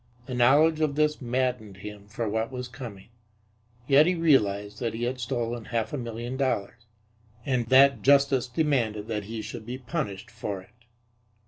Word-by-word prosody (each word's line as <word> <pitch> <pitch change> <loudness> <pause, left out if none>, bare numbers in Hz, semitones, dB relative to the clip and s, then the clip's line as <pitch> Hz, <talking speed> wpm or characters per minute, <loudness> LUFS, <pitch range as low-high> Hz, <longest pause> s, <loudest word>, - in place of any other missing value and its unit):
The 130 - -6
knowledge 145 +6 +4
of 155 -3 +1
this 150 0 +1
maddened 125 -5 -2
him 105 0 -9
for 110 +2 -3
what 110 +3 -1
was 125 -1 -5
coming. 120 -6 -10 0.8
Yet 145 +4 +6
he 180 - +2
realized 105 - +2
that 115 -2 -2
he 115 - -4
had 125 +1 -2
stolen 120 -2 -3
half 115 +1 -2
a - - -1
million 120 +2 -5
dollars, 115 -4 -2 0.6
and 125 -4 0
that 135 +2 +6
justice 140 -2 +4
demanded 125 -7 0
that 105 -2 -2
he 110 +1 -5
should 110 - -7
be 125 +1 -4
punished 130 - -4
for 100 -2 -4
it. 115 +5 -20
120 Hz, 165 wpm, -27 LUFS, 110-135 Hz, 0.8 s, Yet